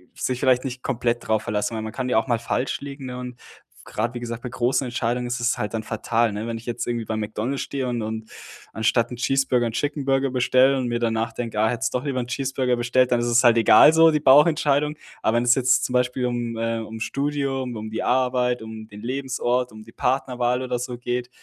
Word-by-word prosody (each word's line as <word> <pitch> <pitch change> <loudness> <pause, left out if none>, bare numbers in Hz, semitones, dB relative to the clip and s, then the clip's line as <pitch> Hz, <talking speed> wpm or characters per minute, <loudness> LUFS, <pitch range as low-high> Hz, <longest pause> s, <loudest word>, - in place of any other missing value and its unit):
sich 130 -1 -2
vielleicht 130 0 +2
nicht 130 -1 -5
komplett 120 -2 -1
drauf 110 -1 +1
verlassen, 105 +1 -2
weil 110 - -3
man 110 0 -6
kann 125 -1 -3
ja 120 - +2
auch 115 - -4
mal 120 -3 +2
falsch 125 +4 -2
liegen, 140 -1 -8
ne, 125 0 -6
und 125 -1 -7 0.5
grad, 115 +3 -3
wie - - -3
gesagt, 120 -1 -6
bei 125 - -4
großen 130 +2 0
Entscheidungen 120 0 -2
ist 120 0 -3
es 120 +1 +1
halt 105 - -3
dann 110 - -3
fatal, 115 +1 0
ne, 105 +3 -4
wenn 115 -1 -3
ich 115 - -12
jetzt 120 - -3
irgendwie 120 -2 -2
bei 110 - -3
McDonald's 110 +5 -3
stehe 135 -2 -3
und 120 -2 -2
und 110 0 -5 0.4
anstatt 115 +2 +1
'n 125 - -4
Cheeseburger 125 -1 +1
'n - - -3
Chicken 145 +2 -2
Burger 135 -1 +1
bestelle 130 +2 +3
und 130 -2 -1
mir 120 0 -1
danach 115 0 -1
denke: 115 -3 -4
„Ah, 110 - +3
hättest 130 +3 -2
doch 125 - -1
lieber 135 -3 -2
'n 125 - -2
Cheeseburger 130 0 -1
bestellt“, 125 +1 +2
dann 120 - +3
ist 120 - -1
es 120 +1 +4
halt 120 -1 +5
egal 115 +7 +7
so 165 0 +7
die 150 - +1
Bauchentscheidung, 150 +1 +4 0.3
aber 115 +2 +2
wenn 120 - +1
es 120 - +6
jetzt 130 -1 +3
zum 125 - -4
Beispiel 125 0 +1
um, 120 -2 -2
äh 115 0 -1
um 110 0 -7
das 110 - -3
Studium, 140 -3 -2
um 110 0 -6
die 110 - -3
Arbeit, 125 -1 +1
um 110 -1 -9
den 105 -1 -12
Lebensort, 125 -1 -1
um 110 0 -12
die 115 - -15
Partnerwahl 125 -1 0
oder 125 -1 -2
so 125 -1 -5
geht, 125 0 -3
125 Hz, 240 wpm, -23 LUFS, 115-130 Hz, 0.5 s, egal